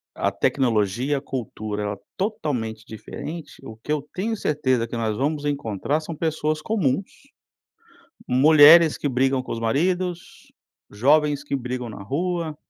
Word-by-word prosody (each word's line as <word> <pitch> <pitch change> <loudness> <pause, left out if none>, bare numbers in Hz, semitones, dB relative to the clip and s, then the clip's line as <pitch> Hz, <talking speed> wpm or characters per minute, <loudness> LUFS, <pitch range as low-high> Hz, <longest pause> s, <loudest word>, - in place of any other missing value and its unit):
a - - 0
tecnologia, 120 +2 +1
a - - -4
cultura, 110 -6 -5
ela 105 0 -2
é - - -9 0.2
totalmente 125 - -3
diferente, 155 +9 -8
o 110 - -8
que 130 +7 -7
eu 150 - +1
tenho 220 +4 -2
certeza 130 - 0
que 120 - -5
nós 110 -2 -1
vamos 145 +2 -1
encontrar 140 0 -1
são 160 +1 -7
pessoas 155 -1 -1
comuns 190 -6 0 1.2
mulheres 155 +4 +7
que 145 - -1
brigam 130 0 +1
com - - -6
os 115 - -4
maridos, 175 +9 -2 0.4
jovens 145 +6 +2
que 140 - -4
brigam 125 -1 -3
na 105 - -9
rua. 165 - -2
140 Hz, 145 wpm, -23 LUFS, 115-155 Hz, 1.2 s, mulheres